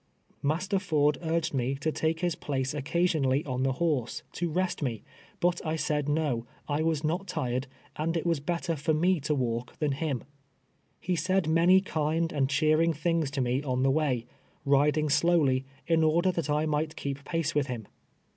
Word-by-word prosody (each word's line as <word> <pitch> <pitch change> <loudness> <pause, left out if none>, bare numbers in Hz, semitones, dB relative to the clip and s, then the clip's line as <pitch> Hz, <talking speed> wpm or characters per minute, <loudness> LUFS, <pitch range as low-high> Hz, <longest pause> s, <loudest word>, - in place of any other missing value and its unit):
IMaster 185 +7 0
Ford 150 -5 +2
urged 165 -1 -1
me 135 +1 0
lo 155 - +3
take 160 +2 -1
his 175 -2 +1
place 135 -3 -2
occasion 160 +2 0
ally 135 +3 +2
on 130 -2 -2
the 135 0 +2
horse, 145 -5 -1
to 175 0 -2
rest 180 +2 -1
me; 120 -7 -2 0.4
but 175 -1 +1
I 155 -1 -1
said 150 -1 -1
no, 145 -6 0 0.2
I 145 +1 0
was 160 -2 0
not 175 +6 -1
tired, 130 -6 -2 0.3
and 165 +2 0
it 165 - -3
was 165 -3 +1
better 170 +3 -2
for 155 +2 0
me 175 +3 +2
to 150 +1 -1
M'alk 120 -1 -2
than 150 -2 0
him. 135 -2 -2 0.8
He 180 +1 -1
said 185 +1 +1
many 170 +4 +5
kind 160 -2 -1
and 135 -3 +1
cheering 155 +3 +3
things 160 -1 0
to 140 -1 -2
me 125 +2 +1
on 130 -3 -1
the 135 - +4
way, 135 -6 0 0.4
riding 145 +2 +3
slowly, 145 -4 +3 0.2
in 165 -1 +3
order 170 +4 +3
that 165 -4 -3
I 150 +1 +2
might 155 0 -1
keep 140 0 -4
pace 165 +1 -1
with 145 -2 +1
him. 120 -5 -5
155 Hz, 185 wpm, -28 LUFS, 140-165 Hz, 0.8 s, many